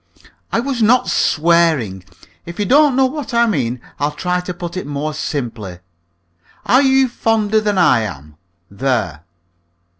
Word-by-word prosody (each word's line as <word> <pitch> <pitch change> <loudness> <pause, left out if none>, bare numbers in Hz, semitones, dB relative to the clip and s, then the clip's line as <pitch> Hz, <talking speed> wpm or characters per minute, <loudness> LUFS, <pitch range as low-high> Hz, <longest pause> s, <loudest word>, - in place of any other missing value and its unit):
"I - - +1
was 255 -1 -2
not 240 +4 +3
swearing. 155 - +1 0.4
If 170 - -8
you 205 - -1
don't 285 +4 +4
know 265 0 +4
what 270 -2 -4
I 235 0 +4
mean, 130 - -1 0.2
I'll 145 +1 +1
try 180 +2 -1
to 180 0 -5
put 175 -1 -7
it 185 - -5
more 145 +1 -3
simply. 120 - -5 0.9
Are 255 +3 +4
you 265 -1 +3
fonder 220 -3 0
than 210 -2 -1
I 170 -9 +4
am? 75 -9 -7 0.4
There." 100 - -2
175 Hz, 150 wpm, -17 LUFS, -, 0.9 s, don't